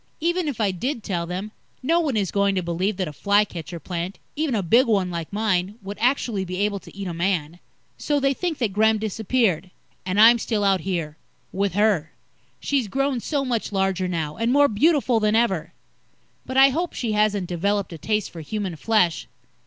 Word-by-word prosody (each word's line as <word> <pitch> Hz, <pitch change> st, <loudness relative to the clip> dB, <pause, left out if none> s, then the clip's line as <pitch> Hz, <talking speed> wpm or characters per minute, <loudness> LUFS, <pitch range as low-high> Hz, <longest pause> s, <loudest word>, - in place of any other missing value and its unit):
Even 345 Hz, +1 st, 0 dB
if 275 Hz, -6 st, -3 dB
I 205 Hz, -3 st, +2 dB
did 230 Hz, -, -3 dB
tell 170 Hz, -3 st, -2 dB
them, 185 Hz, +4 st, -5 dB, 0.3 s
no 330 Hz, +6 st, +3 dB
one 290 Hz, -9 st, 0 dB
is 195 Hz, -4 st, 0 dB
going 200 Hz, -1 st, +2 dB
to 185 Hz, -, 0 dB
believe 180 Hz, +4 st, -1 dB
that 185 Hz, -3 st, -1 dB
a 150 Hz, -, -7 dB
fly 205 Hz, +6 st, +3 dB
catcher 170 Hz, -2 st, -7 dB
plant 175 Hz, +3 st, -5 dB, 0.2 s
even 300 Hz, -4 st, 0 dB
a 200 Hz, -, 0 dB
big 235 Hz, +10 st, +4 dB
one 195 Hz, -5 st, +1 dB
like 170 Hz, -2 st, -5 dB
mine 200 Hz, -1 st, 0 dB
would 200 Hz, +1 st, -7 dB
actually 235 Hz, -5 st, +1 dB
be 185 Hz, 0 st, -5 dB
able 205 Hz, -1 st, 0 dB
to 190 Hz, -, -15 dB
eat 200 Hz, -, -5 dB
a 175 Hz, -, -4 dB
man. 170 Hz, -2 st, -1 dB, 0.4 s
So 290 Hz, -1 st, 0 dB
they 275 Hz, 0 st, +2 dB
think 335 Hz, +2 st, -3 dB
that 225 Hz, -6 st, -1 dB
Gremm 220 Hz, +2 st, +3 dB
disappeared. 215 Hz, -4 st, 0 dB, 0.3 s
And 185 Hz, +2 st, -1 dB
I'm 230 Hz, +2 st, +8 dB
still 220 Hz, -2 st, -1 dB
out 195 Hz, -2 st, +3 dB
here 165 Hz, -5 st, -3 dB, 0.3 s
with 195 Hz, -1 st, -1 dB
her. 205 Hz, -7 st, +2 dB, 0.5 s
She's 275 Hz, -6 st, 0 dB
grown 275 Hz, +3 st, 0 dB
so 280 Hz, +3 st, -2 dB
much 235 Hz, -5 st, -2 dB
larger 190 Hz, -2 st, 0 dB
now, 160 Hz, -4 st, -3 dB
and 230 Hz, +2 st, +1 dB
more 285 Hz, +2 st, +5 dB
beautiful 260 Hz, 0 st, +2 dB
than 215 Hz, 0 st, +2 dB
ever. 195 Hz, -8 st, +1 dB, 0.8 s
But 260 Hz, -, -3 dB
I 270 Hz, +1 st, +8 dB
hope 335 Hz, +6 st, -2 dB
she 235 Hz, -3 st, -2 dB
hasn't 210 Hz, -2 st, +1 dB
developed 195 Hz, +2 st, -1 dB
a 165 Hz, -, -9 dB
taste 210 Hz, +5 st, -1 dB
for 165 Hz, -, -8 dB
human 190 Hz, +1 st, -4 dB
flesh. 180 Hz, -2 st, +1 dB
205 Hz, 200 wpm, -23 LUFS, 180-235 Hz, 0.8 s, I'm